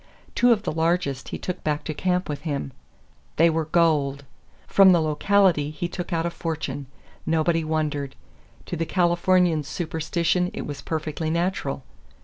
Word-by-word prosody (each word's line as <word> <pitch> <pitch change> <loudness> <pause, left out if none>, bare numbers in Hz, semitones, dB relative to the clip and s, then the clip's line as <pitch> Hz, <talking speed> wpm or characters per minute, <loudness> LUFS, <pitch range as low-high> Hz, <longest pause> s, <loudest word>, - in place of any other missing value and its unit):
Two 245 0 +4
of 215 -3 +2
the - - -1
largest 160 -4 0
he - - -4
took 180 0 -5
back 150 -1 -1
to 155 - -4
camp 180 +3 0
with 145 -2 -4
him. 145 -3 -3 0.6
They 165 +1 +5
were 160 0 -1
gold! 150 -4 +1 0.4
From 195 -2 +6
the 175 - +4
locality 160 0 +2
he 155 +3 -4
took 175 +1 -6
out 165 -1 0
a 170 - -1
fortune. 160 -4 -4 0.4
Nobody 165 +1 +1
wondered. 150 -3 -2 0.5
To - - -4
the 165 -1 -2
Californian's 175 -3 +2
superstition 170 +2 -1
it - - -4
was 145 -2 -6
perfectly 155 0 -3
natural. 170 -5 -1
165 Hz, 155 wpm, -24 LUFS, 150-175 Hz, 0.6 s, From